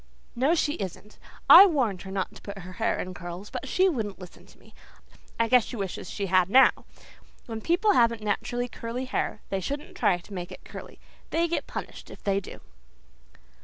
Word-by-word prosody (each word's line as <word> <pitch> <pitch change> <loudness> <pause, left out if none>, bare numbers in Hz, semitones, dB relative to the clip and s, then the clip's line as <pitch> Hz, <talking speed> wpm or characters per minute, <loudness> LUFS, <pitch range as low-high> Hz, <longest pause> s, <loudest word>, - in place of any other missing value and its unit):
"No, 270 +8 +2
she 295 -3 +1
isn't. 200 +2 -7 0.3
I 395 - +11
warned 245 - 0
her 190 - -8
not 190 -1 -3
to - - -13
put 200 -1 -8
her 185 -1 -9
hair 230 - +1
in 185 - -5
curls 175 +3 -8
but - - -5
she 375 +7 +3
wouldn't 220 - -2
listen 180 -2 -13
to - - -19
me. - - -21 0.7
I 230 - +3
guess 250 0 +5
she - - -7
wishes 195 -4 -5
she 200 - -3
had 185 -1 +3
now. 265 +5 +7 0.7
When 225 -2 -6
people 360 - +2
haven't 230 - +3
natural 240 +4 -2
curly 240 +2 -5
hair 255 - -2
they 195 - -1
shouldn't 290 - -5
try 180 - +2
to 175 +4 -14
make 175 -2 -6
it - - -11
curly. - - -10 0.3
They 335 +1 +1
get 340 - -2
punished - - -7
if - - -13
they 195 -1 +1
do." 200 - -11
220 Hz, 200 wpm, -27 LUFS, 190-265 Hz, 0.7 s, I